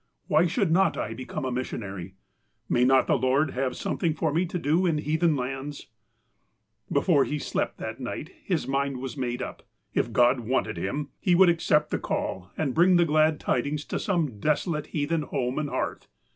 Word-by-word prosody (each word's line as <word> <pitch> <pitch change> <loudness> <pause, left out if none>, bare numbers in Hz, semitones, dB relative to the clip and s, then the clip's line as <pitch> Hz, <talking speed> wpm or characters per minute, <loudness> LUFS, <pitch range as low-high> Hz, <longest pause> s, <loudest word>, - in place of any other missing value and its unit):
Why 155 +4 +3
should 185 0 0
not 190 +3 +3
I 110 - -3
become 130 +4 -5
a 130 - -1
missionary? 100 -7 -5 0.5
May 120 - +2
not 130 +1 +5
the - - +2
Lord 135 +4 +2
have 130 -1 -2
some - - -3
thing 165 -3 +1
for 160 -2 0
me 175 +3 +1
to 180 - -3
do 165 +3 +2
in 160 -3 +1
heathen 160 +2 +1
lauds? 135 +2 -5 0.5
" 110 0 -32
Before 145 0 +4
he 150 - -2
slept - - -2
that - - -6
night - - -5
his - - -1
mind 135 0 0
was 130 +2 -5
made 125 -3 -2
up: - - -7 0.3
If - - 0
God 125 +2 +4
wanted 120 -5 -1
him, 140 - -3
he 180 - +3
would 185 0 +7
accept 150 -3 +2
the - - 0
call 95 0 -3
and 140 -5 0
bring 180 +4 +5
the 175 -1 +5
glad 155 0 +3
tidings 150 +1 -1
to - - -3
some 165 - -1
desolate 150 - 0
heathen 155 +2 -1
home 130 -3 -2
and 150 -1 -2
hearth. - - -3
145 Hz, 195 wpm, -26 LUFS, 130-160 Hz, 0.5 s, would